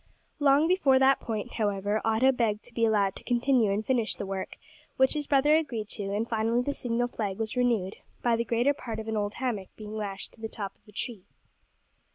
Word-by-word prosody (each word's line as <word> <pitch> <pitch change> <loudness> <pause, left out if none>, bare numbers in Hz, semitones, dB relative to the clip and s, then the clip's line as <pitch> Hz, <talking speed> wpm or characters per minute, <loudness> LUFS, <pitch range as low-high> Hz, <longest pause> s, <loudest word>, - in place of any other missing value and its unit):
Long 290 +2 +4
before 335 -8 +4
that 265 +1 +5
point, 225 +1 -4
however, 205 -1 0
Otto 225 +4 +4
begged 225 -4 0
to 245 - -14
be 230 -1 +2
allowed 205 -3 +2
to - - -10
continue 245 -2 +2
and 210 +2 -1
finish 240 -4 +1
the - - -5
work, 190 -1 -5 0.4
which 265 0 +4
his 295 -2 -3
brother 290 +2 +4
agreed 240 -10 -1
to, 205 - -3
and, 205 +3 -1
finally, 230 +2 +1
the 285 - -1
signal 245 -1 -1
flag 205 -5 -3
was 225 +1 -3
renewed, 230 -6 +1 0.3
by 235 -1 +3
the 230 - 0
greater 240 +4 +2
part 230 -6 -6
of 220 - -6
an 220 - -2
old 205 0 -1
hammock 235 -7 -2
being 215 0 -7
lashed 200 -2 -5
to 225 - -19
the 220 - -4
top 200 -3 -5
of - - -38
the - - -15
tree. 210 -2 -5
230 Hz, 215 wpm, -28 LUFS, 210-255 Hz, 0.4 s, that